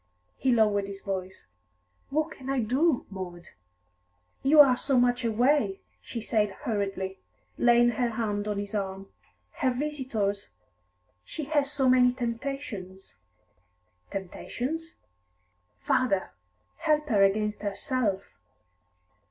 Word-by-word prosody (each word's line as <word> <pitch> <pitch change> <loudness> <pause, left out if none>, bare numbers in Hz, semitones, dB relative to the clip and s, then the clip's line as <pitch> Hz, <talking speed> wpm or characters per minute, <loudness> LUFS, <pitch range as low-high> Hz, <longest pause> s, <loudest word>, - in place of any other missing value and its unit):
He 260 - +1
lowered 210 -4 +3
his 195 0 -8
voice. 190 -2 -5 0.6
"What 310 +3 0
can 265 -3 -9
I 275 -1 +1
do, 255 +6 +2
Maud?" 180 -3 -7 0.9
"You 295 +3 +5
are 270 -4 +9
so 265 0 +1
much 245 0 +2
away," 275 - +2 0.2
she 235 - -6
said 215 -1 +1
hurriedly, 195 -3 -2 0.4
laying 240 0 +5
her 240 +1 0
hand 210 -2 -2
on 210 -1 -1
his 200 0 -4
arm. 195 -1 -3 0.5
"Her 260 - +2
visitors 250 -7 -2 0.7
she 310 - -6
has 290 -1 +1
so 275 -3 +1
many 250 -1 +5
temptations 235 -6 -5 0.5
" 90 0 -43
"Temptations?" 255 - -5 0.9
"Father, 195 -7 +1 0.5
help 300 0 +1
her 210 -4 +3
against 210 +2 +2
herself!" 205 -1 -1
230 Hz, 115 wpm, -28 LUFS, 195-265 Hz, 0.9 s, are